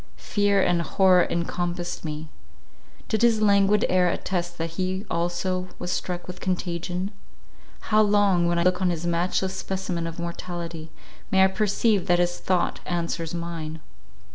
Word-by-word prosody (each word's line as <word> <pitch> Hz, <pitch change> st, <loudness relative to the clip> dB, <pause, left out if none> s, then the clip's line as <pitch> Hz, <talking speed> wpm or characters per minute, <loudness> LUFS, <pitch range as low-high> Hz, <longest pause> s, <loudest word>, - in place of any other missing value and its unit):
Fear 200 Hz, -, +2 dB
and 175 Hz, -1 st, +2 dB
horror 185 Hz, +1 st, +4 dB
encompassed 175 Hz, +1 st, -2 dB
me. 155 Hz, 0 st, -5 dB, 0.8 s
Did 220 Hz, -, 0 dB
his 235 Hz, -2 st, +4 dB
languid 200 Hz, 0 st, +4 dB
air 180 Hz, -1 st, +3 dB
attest 175 Hz, -1 st, -2 dB
that 165 Hz, 0 st, -3 dB
he 185 Hz, +3 st, -2 dB
also 175 Hz, +2 st, -1 dB
was 180 Hz, 0 st, -4 dB
struck 175 Hz, 0 st, -3 dB
with 180 Hz, 0 st, -8 dB
contagion? 180 Hz, +1 st, -2 dB, 0.7 s
How 215 Hz, -1 st, +3 dB
long, 205 Hz, -4 st, +3 dB
when 170 Hz, 0 st, +1 dB
I 170 Hz, -, +2 dB
look 180 Hz, +1 st, +2 dB
on 185 Hz, -, +3 dB
this 170 Hz, -1 st, -2 dB
matchless 180 Hz, +2 st, 0 dB
specimen 185 Hz, -3 st, -3 dB
of 165 Hz, -, -7 dB
mortality, 170 Hz, -1 st, -5 dB, 0.4 s
may 190 Hz, 0 st, +5 dB
I -, -, +7 dB
perceive 210 Hz, 0 st, +1 dB
that 175 Hz, -, +4 dB
his 175 Hz, 0 st, 0 dB
thought 180 Hz, -2 st, 0 dB
answers 170 Hz, -1 st, -2 dB
mine? 165 Hz, -2 st, -5 dB
180 Hz, 150 wpm, -25 LUFS, 170-190 Hz, 0.8 s, I